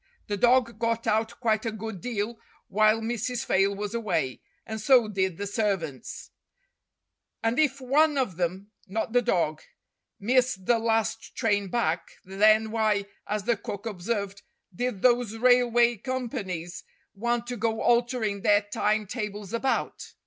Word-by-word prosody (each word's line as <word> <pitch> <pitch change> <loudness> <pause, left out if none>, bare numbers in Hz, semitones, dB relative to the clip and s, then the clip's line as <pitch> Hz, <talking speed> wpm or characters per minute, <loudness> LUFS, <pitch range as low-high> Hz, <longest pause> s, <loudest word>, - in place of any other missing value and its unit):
The 205 - -2
dog 240 0 +3
got 230 0 0
out 220 +1 0
quite 220 -3 +1
a 225 - -2
good 220 -3 -6
deal 225 -1 -3 0.3
while 215 +2 +3
Mrs. 240 +2 -2
Fayle 195 +1 +2
was 205 +1 -4
away, 190 - -1 0.2
and 220 -1 -5
so 240 0 +5
did 190 -4 -1
the 200 - -3
servants; 195 - -3 1.1
and 225 +4 +1
if 280 -3 +2
one 290 +3 +3
of 250 -10 0
them 185 +4 -3 0.2
not 220 +3 -3
the 245 - +5
dog 160 -8 0 0.6
missed 245 -3 +1
the 235 +2 +3
last 225 0 -1
train 205 -4 +1
back, 185 -5 -1
then 215 +3 +3
why, 215 -3 +1 0.2
as 210 0 -2
the 235 +2 +2
cook 200 0 -7
observed, 200 -1 -3 0.3
did 245 0 -3
those 240 -3 +3
railway 240 -1 +4
companies 200 - -4 0.3
want 235 +3 -1
to 245 0 -4
go 225 0 -1
altering 235 -4 +1
their 205 0 +4
time 210 +1 0
tables 210 -1 -5
about 260 +3 -2
220 Hz, 145 wpm, -27 LUFS, 200-240 Hz, 1.1 s, so